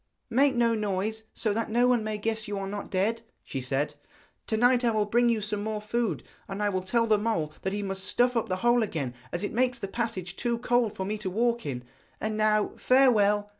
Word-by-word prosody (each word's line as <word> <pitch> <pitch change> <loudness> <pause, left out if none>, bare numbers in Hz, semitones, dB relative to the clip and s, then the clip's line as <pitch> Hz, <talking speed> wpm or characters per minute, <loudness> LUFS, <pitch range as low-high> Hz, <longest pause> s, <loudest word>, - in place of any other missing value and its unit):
'Make 270 +2 +4
no 235 -1 +3
noise, 215 +1 -2
so 215 -3 -1
that 230 +2 -2
no 240 +3 +3
one 245 -3 +3
may 215 0 -2
guess 220 +1 -2
you 205 -1 -3
are 195 - -3
not 205 +1 -5
dead,' 210 +5 0 0.2
she 135 - -5
said. 135 +4 -1 0.5
'To 220 - 0
night 245 +2 +4
I 240 - +4
will 215 -2 +1
bring 240 +3 +3
you 225 -2 +1
some 210 0 -1
more 215 0 -2
food, 225 +2 -2 0.2
and 200 0 -4
I 205 - +2
will 185 -2 -1
tell 230 +5 +1
the 215 -2 +3
mole 170 -9 -1
that 190 - -2
he 205 +1 -2
must 195 -1 -3
stuff 245 +4 +2
up 230 - 0
the 185 - +1
hole 240 0 +5
again, 155 - -2 0.2
as 175 - -2
it 205 - -3
makes 250 +1 +1
the 205 -5 -5
passage 195 -4 -3
too 235 +2 -1
cold 240 -2 +1
for 190 - -3
me 210 +2 -3
to 200 -3 -3
walk 235 +1 0
in. 125 -3 -4 0.4
And 215 0 -2
now 215 -1 +2
farewell.' 210 -6 +4
215 Hz, 235 wpm, -28 LUFS, 195-235 Hz, 0.5 s, hole